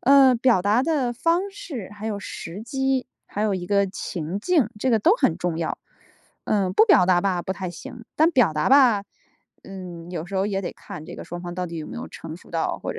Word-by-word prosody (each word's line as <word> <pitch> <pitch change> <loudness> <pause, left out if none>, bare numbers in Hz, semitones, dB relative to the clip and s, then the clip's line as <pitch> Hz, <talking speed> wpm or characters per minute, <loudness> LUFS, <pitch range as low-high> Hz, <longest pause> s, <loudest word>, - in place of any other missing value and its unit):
呃， 270 -1 +6
表 235 -4 +3
达 205 +6 +3
的 275 -5 +1
方 340 +9 +1
式， 310 - -7
还 210 +1 -7
有 205 -2 -2
时 180 0 -7
机， 265 +1 -1 0.2
还 205 - -5
有 210 -2 +1
一 180 -1 -4
个 200 +1 +3
情 180 -2 -4
境， 285 - +2
这 260 +3 0
个 225 - +4
都 350 - +4
很 165 - +1
重 175 -2 -1
要。 165 -1 -2 0.7
嗯， 195 -3 +1
不 440 - +7
表 185 - +5
达 180 -1 +4
吧 185 -3 +1
不 190 - -3
太 185 -1 -4
行， 230 +6 -10
但 315 +2 +4
表 245 - +3
达 150 0 0
吧， 255 -7 +6 0.6
嗯， 180 -3 -9
有 170 -3 -4
时 195 - -8
候 190 - +2
也 195 -2 -1
得 185 - -4
看 155 - -10
这 - - -8
个 - - -8
双 175 0 -7
方 175 -1 -6
到 180 0 -3
底 170 -1 -7
有 155 - -6
没 - - -8
有 - - -5
成 160 0 -8
熟 - - -18
到 165 -1 -1
或 - - -4
者 - - -8
200 Hz, 255 characters per minute, -24 LUFS, 175-255 Hz, 0.7 s, 不